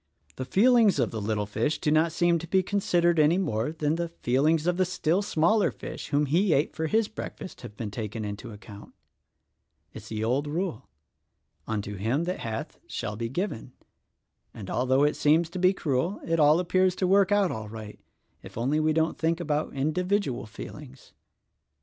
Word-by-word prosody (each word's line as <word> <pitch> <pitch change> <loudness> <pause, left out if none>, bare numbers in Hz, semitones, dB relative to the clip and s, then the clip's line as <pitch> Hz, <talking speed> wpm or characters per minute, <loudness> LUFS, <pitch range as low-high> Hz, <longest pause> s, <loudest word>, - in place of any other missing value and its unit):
The 130 - -4
feelings 220 - +4
of 120 -5 +1
the 110 - -4
little 105 0 -1
fish 145 +9 -1
do 150 - 0
not 160 +2 +3
seem 170 0 +2
to 170 - -8
be 190 +2 +2
considered 175 -4 +1
any 155 +3 +4
more 115 - -1
than 155 0 -1
the 170 0 -2
feelings 155 +1 +1
of 180 0 +1
the 185 - +3
still 180 0 0
smaller 200 +2 +2
fish - - -8
whom 145 0 +1
he 170 +6 +2
ate 145 +3 +1
for 160 0 -1
his 220 +5 +2
breakfast 200 -3 -8
have 105 -4 -10
been 105 -3 -4
taken 110 0 -5
into 100 +1 -6
account. 105 0 -12 1.0
It's - - -10
the 110 0 -3
old 130 +6 0
rule, 155 - -3 0.8
'Unto 105 -2 -3
him 115 - 0
that 180 +2 -3
hath 110 -1 -5
shall 105 - -4
be 115 +1 -3
given' 175 - -4 0.8
and, 100 -4 -7
although 130 +2 +2
it 150 - +2
seems 160 +3 +2
to 185 - -5
be 185 +1 +5
cruel, 165 +1 -1
it 165 0 0
all 150 +2 +5
appears 185 +1 +2
to 185 - 0
work 195 +1 +4
out 205 -3 +3
all 110 -1 -5
right 110 -1 -9 0.2
— - - -44
if - - -12
only 135 +6 +1
we 155 0 +2
don't 160 0 0
think 165 +1 +1
about 150 -2 -1
individual 155 - -1
feelings." 135 +5 -11
155 Hz, 185 wpm, -27 LUFS, 120-180 Hz, 1.0 s, be